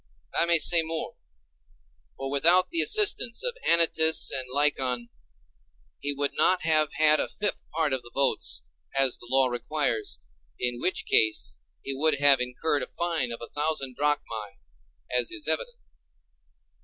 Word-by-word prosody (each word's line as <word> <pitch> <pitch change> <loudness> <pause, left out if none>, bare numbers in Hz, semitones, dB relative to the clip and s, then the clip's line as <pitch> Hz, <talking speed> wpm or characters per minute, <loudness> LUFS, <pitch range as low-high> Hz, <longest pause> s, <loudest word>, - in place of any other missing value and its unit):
And 65 - -20
I - - +3
may 170 0 +4
say 165 +1 +4
more; 160 0 -5 1.0
for 135 0 -6
without 170 - +3
the 335 -1 +5
assistance 415 - +3
of - - -1
Anytus 160 -1 +4
and 130 -1 -1
Lycon, 130 -4 0 0.9
he 145 - -2
would 140 0 -1
not 185 -1 +1
have 155 -2 +4
had 155 0 +4
a - - 0
fifth 205 -1 -4
part 155 -3 -1
of 130 - -1
the 120 - -14
votes, 135 - -1 0.3
as 135 -2 +1
the 120 - -13
law 135 +1 +2
requires, 120 - -3 0.4
in 120 -1 -3
which 185 - -1
case 110 -1 +1 0.2
he 135 - -5
would 155 +3 +1
have 140 -2 +4
incurred 130 +4 -2
a - - -2
fine 165 -8 -3
of 115 - -7
a - - -9
thousand 145 -4 -2
drachmæ, 115 -8 -3 0.6
as 125 - 0
is 345 -3 -8
evident. - - -3
145 Hz, 155 wpm, -25 LUFS, 130-165 Hz, 1.0 s, the